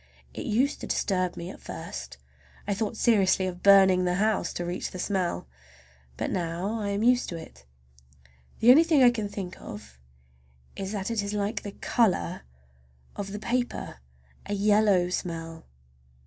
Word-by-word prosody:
It - - -6
used 260 +7 +1
to - - -5
disturb 185 -3 0
me 170 +2 -6
at - - -12
first. 65 -1 -7 0.5
I 205 - +1
thought 220 +2 -3
seriously 195 -5 +3
of 180 -1 -5
burning 190 -2 +6
the 180 0 +1
house—to 205 -3 0
reach 175 +2 -3
the - - -8
smell. 180 - -1 0.7
But - - -2
now 180 +5 -2
I 205 - -3
am 200 +2 -1
used 245 +1 +3
to 170 - -5
it. - - -12 1.0
The 235 +2 +8
only 305 +6 +8
thing 315 -5 +4
I 245 - +7
can 215 -4 -3
think 190 -3 -7
of 65 -12 -10 0.8
that 195 +2 -4
it 225 -2 0
is 200 0 -4
like 205 +1 -1
is - - -19
the 200 - -6
color 190 - +1 0.7
of 195 -1 -5
the 205 - -4
paper! 245 - -2 0.5
A 205 - -2
yellow 205 -3 +3
smell. 165 -2 -5
195 Hz, 160 wpm, -27 LUFS, 180-215 Hz, 1.0 s, The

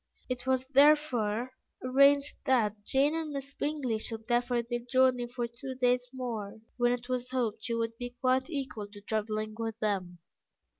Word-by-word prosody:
It 255 0 -4
was 260 0 +2
therefore 260 -5 +4 0.3
arranged 275 +2 +5
that 215 -6 +2
Jane 275 +6 +2
and 325 -1 -2
Miss 280 -1 -5
Bingley 280 -8 -1
should 225 0 -5
defer 240 0 +1
their 240 +1 -3
journey 250 0 +2
for 240 0 -3
two 235 +3 -7
days 250 -1 +2
more, 230 -5 -5 0.2
when 240 -1 +3
it 245 0 -3
was 250 -1 -2
hoped 230 -4 -1
she 235 - -1
would 230 0 -2
be 245 0 -6
quite 260 +2 +2
equal 265 -9 -4
to 205 0 -13
travelling 215 0 -2
with 225 -1 -3
them. 195 -5 -2
245 Hz, 165 wpm, -30 LUFS, 225-260 Hz, 0.3 s, arranged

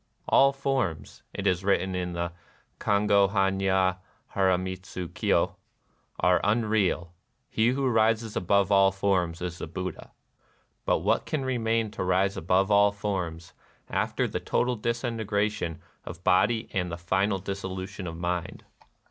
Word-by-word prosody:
" - - -41
All 135 0 +6
forms," 135 - -2
it 100 - -5
is 95 -1 +1
written 95 -1 +1
in 90 -1 -3
the 85 0 -2 0.5
ICongd 100 -1 +3
hannya 95 -2 +2 0.4
liaramitsu 95 -1 -1
Kyo^ - - +1 0.3
" - - -40 0.3
are 90 -1 +3
unreal: 105 -5 +1 0.4
he 110 +1 +2
who 135 +2 +1
rises 110 -1 +2
above 100 +2 +2
all 100 -1 +5
forms 95 -4 0
is 85 -1 -4
the - - -5
Buddha." 90 +2 -6 0.8
But - - +2
what - - +1
can 145 -4 -2
remain 115 -3 0
to 105 - -4
rise 95 +2 +1
above 95 +4 +1
all 100 0 +5
forms 90 -5 -4 0.4
after - - 0
the - - -3
total 125 0 0
disintegration 110 -6 -2 0.2
of 85 +1 -9
body 105 +5 +3
and 90 -2 -1
the 85 - -4
final 95 +4 0
dissolution 95 0 -5
of 85 0 -6
mind 85 0 -3
95 Hz, 140 wpm, -27 LUFS, 90-105 Hz, 0.8 s, All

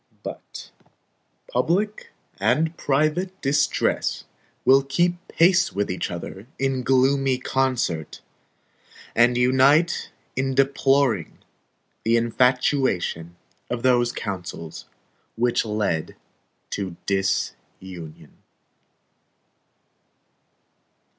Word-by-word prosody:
But - - -9 0.8
public 210 - -1 0.3
and 145 - +1
private 155 +8 0
distress 140 +1 +1 0.4
will 135 +1 +6
keep 175 +6 -1
pace 180 +2 +3
with 100 -1 -1
each 90 - -3
other 95 +4 -7
in 135 -1 0
gloomy 135 +1 +2
concert; 125 - -1 1.0
and 120 +1 +4
unite 130 +6 +3 0.3
in 135 0 -1
deploring 135 - +2 0.7
the 115 +1 +3
infatuation 120 - +1 0.3
of 120 -1 -3
those 120 -2 +3
counsels 90 -7 -6 0.5
which 120 +1 +1
led 105 -7 -2 0.6
to 95 -4 -4
disunion. 95 -3 -3
130 Hz, 75 wpm, -23 LUFS, 100-140 Hz, 1.0 s, will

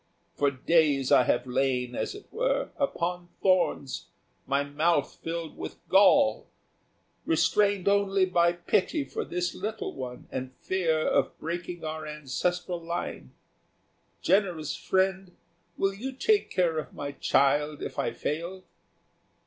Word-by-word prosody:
For 145 - +2
days 140 0 +2
I 130 -3 +6
have 120 +1 +1
lain, 125 -1 0
as 375 - -3
it 410 - -11
were, - - 0
upon 175 -9 -1
thorns, 185 -7 +1 0.4
my 140 +1 +2
mouth 145 +2 0
filled 165 -1 -4
with - - -7
gall, 205 +9 +5 0.8
restrained 200 -2 +2
only 200 -1 +3
by 170 -2 +3
pity 185 - 0
for - - -4
this 175 0 -2
little 215 +3 -4
one 125 -2 -7
and 130 0 -5
fear 165 -4 0
of - - +1
breaking 175 +1 -5
our 155 0 -4
ancestral 170 +5 -2
line. 170 +1 -5 0.9
Generous 180 -7 +1
friend, 190 -1 0 0.4
will 195 0 +1
you 255 +7 -5
take 415 +10 +2
care 165 -3 +1
of 155 - -8
my 140 0 -4
child 145 +2 +2
if - - -5
I - - 0
fall?" 170 +9 -4
170 Hz, 130 wpm, -28 LUFS, 145-190 Hz, 0.9 s, I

